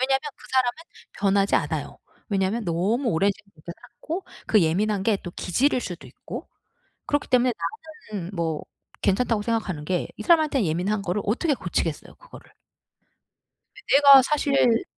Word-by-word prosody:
왜냐면 270 +1 +2 0.2
그 - - -15
사람은 255 -2 +3 0.5
변하지 200 0 +2
않아요. - - -3 0.3
왜냐면 200 +2 0
너무 200 +10 0
오랜 200 0 +2
시간 205 -1 -22
그렇게 165 +2 -9
살았고 340 +5 -7 0.2
그 215 - +4
예민한 200 +5 +1
게 210 +1 +2
또 175 - -6
기질일 255 - 0
수도 180 -7 -7
있고 - - -9 0.6
그렇기 290 0 -1
때문에 250 -1 +3 0.6
나는 190 -3 -5
뭐 165 -4 -2 0.4
괜찮다고 210 +2 +1
생각하는 205 -9 -2
게 180 +1 -1
이 215 - -6
사람한테는 305 - +3
예민한 180 +6 -1
거를 195 +1 -2
어떻게 270 +9 +1
고치겠어요 170 - -3
그거를. - - -16 1.4
내가 280 -1 +9
사실 275 -4 +2
210 Hz, 340 characters per minute, -24 LUFS, 185-255 Hz, 1.4 s, 내가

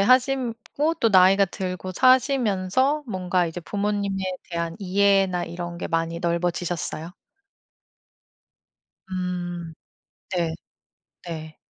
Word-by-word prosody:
하시고 255 +5 +2
또 230 - +4
나이가 195 0 +6
들고 185 0 -5
사시면서 255 - +3
뭔가 185 -3 0
이제 165 +2 -5
부모님에 200 +1 -1 0.3
대한 170 -1 -3
이해나 195 -2 +2
이런 175 0 -6
게 - - -3
많이 165 0 -1
넓어지셨어요? 170 -1 -2 2.0
음. 175 -2 -4 0.6
네. 170 -2 0 0.7
네. 160 -2 -7
185 Hz, 205 characters per minute, -24 LUFS, 175-210 Hz, 2.0 s, 나이가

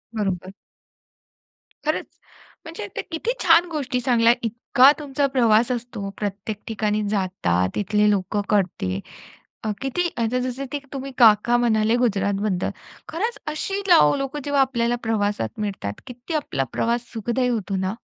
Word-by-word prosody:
बरोबर. 190 -3 -2 1.3
खरचं 310 - -2 0.5
म्हणजे 325 -11 -6
ते - - -1
किती 330 +9 -1
छान 345 - +6
गोष्टी 265 -5 -1
सांगल्या. 235 -2 +4
इतका 245 +4 +4
तुमचा 285 -1 -1
प्रवास 235 -3 +3
असतो 235 -4 -4
प्रत्येक 205 +1 -4
ठिकाणी 215 -1 0
जाता, 185 - 0
तिथले 210 +1 +2
लोकं 205 +1 0
कळते 170 - 0 0.7
अ 215 - 0
किती 345 +7 0
आता 230 +2 +1
जसं 255 +2 -3
ते 290 - -1
तुम्ही 275 -1 -5
काका 230 +1 +6
म्हणाले 225 -1 +2
गुजरातबद्दल. 200 -4 0 0.4
खरचं 445 +9 -3
अशी 390 +6 -3
लो 150 - +6
लोकं 275 +2 -3
जेव्हा 285 -1 +1
आपल्याला 240 -2 0
प्रवासात 205 - -1
मिळतात, 195 - -3
किती 250 +6 -7
आपला 290 - -1
प्रवास 235 +1 -1
सुखदायी 240 +3 -1
होतो 205 -4 -2
ना? 190 +1 -1
230 Hz, 135 wpm, -23 LUFS, 205-260 Hz, 1.3 s, छान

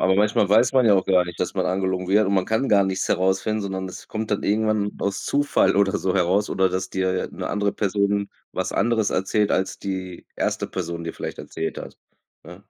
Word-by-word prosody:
aber 95 +1 +3
manchmal 105 -1 +2
weiß 115 +4 +4
man 130 -2 +4
ja 105 -3 +6
auch 95 - +1
gar 90 -2 +4
nicht, 90 - -9
dass - - -2
man - - 0
angelogen 95 0 -1
wird, 105 +1 +4
und 100 - +1
man 95 -1 +2
kann 110 +5 0
gar 100 -1 +5
nichts 95 0 -1
herausfinden, 95 +3 +1
sondern 95 -1 -4
es - - -10
kommt 110 -1 -3
dann 100 - -1
irgendwann 105 -1 +1
aus 100 -1 -2
Zufall 145 -7 +2
oder 100 -1 +3
so 95 - -1
heraus 95 +4 +1
oder 95 0 +2
dass 95 +1 -3
dir 95 -1 -1
'ne - - -6
andere 100 0 0
Person 100 0 0 0.2
was - - -3
anderes 110 0 +1
erzählt 100 +2 +1
als 95 - -1
die 95 -2 -5
1. - - -1
Person 85 -2 -5
dir 80 - -4
vielleicht - - -6
erzählt - - -5
hat, - - -9 0.5
ne? - - -13
100 Hz, 215 wpm, -23 LUFS, 95-105 Hz, 0.5 s, ja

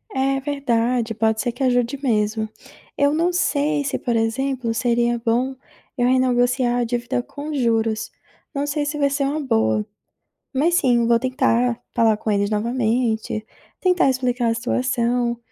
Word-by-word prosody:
É, 270 +1 +1
verdade, 250 -4 0
pode 220 0 +1
ser 245 - -1
que 250 +3 -5
ajude 245 +1 +1
mesmo. 220 -4 0 0.5
Eu 285 0 +3
não 340 +3 +1
sei 295 -3 +1
se, 275 - -2
por 240 - -1
exemplo, 235 +1 -1
seria 240 0 +1
bom 245 +3 +1 0.4
eu 245 -1 +2
renegociar 250 -1 +2
a - - +1
dívida 240 +1 -2
com 295 +4 -7
juros, 225 -4 0 0.4
não 280 +1 0
sei 290 0 -1
se 295 +1 -3
vai 280 -1 +3
ser 280 0 -1
uma 290 +3 -1
boa, 225 -5 +1 0.7
mas, 305 +6 +2
sim, 245 -7 +3
vou 235 0 +4
tentar 250 -2 +1
falar 225 -2 +3
com 215 - -3
eles 200 0 +1
novamente, 220 0 -1 0.3
tentar 360 -6 +3
explicar 250 -2 0
a 230 - +1
situação 240 0 0
245 Hz, 155 wpm, -21 LUFS, 230-270 Hz, 0.7 s, vou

